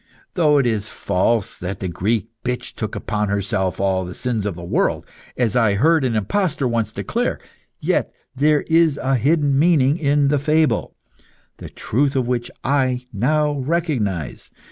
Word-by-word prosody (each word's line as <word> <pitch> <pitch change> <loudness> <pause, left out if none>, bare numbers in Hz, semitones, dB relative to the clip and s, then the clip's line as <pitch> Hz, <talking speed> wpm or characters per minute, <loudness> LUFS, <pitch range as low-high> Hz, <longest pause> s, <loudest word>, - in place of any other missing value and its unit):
Though 150 -4 +3
it 140 - +3
is 110 -3 -1
false 100 +3 0
that 95 +2 -5
the 95 - -3
Greek 105 +6 -1
bitch 125 0 -3
took 110 -2 -5
upon 105 -1 -2
herself 95 -2 -1
all 95 -1 +1
the 90 0 -7
sins 115 -5 -2
of 100 - -3
the 85 - -9
world, 85 - 0 0.3
as 120 -4 +1
I 110 -5 +3
heard 160 +7 +3
an 125 -3 0
impostor 150 - 0
once 115 -3 -1
declare, - - -2 0.4
yet - - 0 0.2
there 150 +2 +3
is 160 -3 +3
a 135 0 0
hidden 140 +2 +2
meaning 155 -2 +3
in 145 -1 +2
the 145 0 +2
fable, 155 +2 +1 0.6
the - - -9
truth 140 +4 -1
of 130 -3 0
which 120 -1 -1
I 130 -2 +1
now 150 +8 +1
recognise. 130 - -2
125 Hz, 165 wpm, -21 LUFS, 105-145 Hz, 0.6 s, Though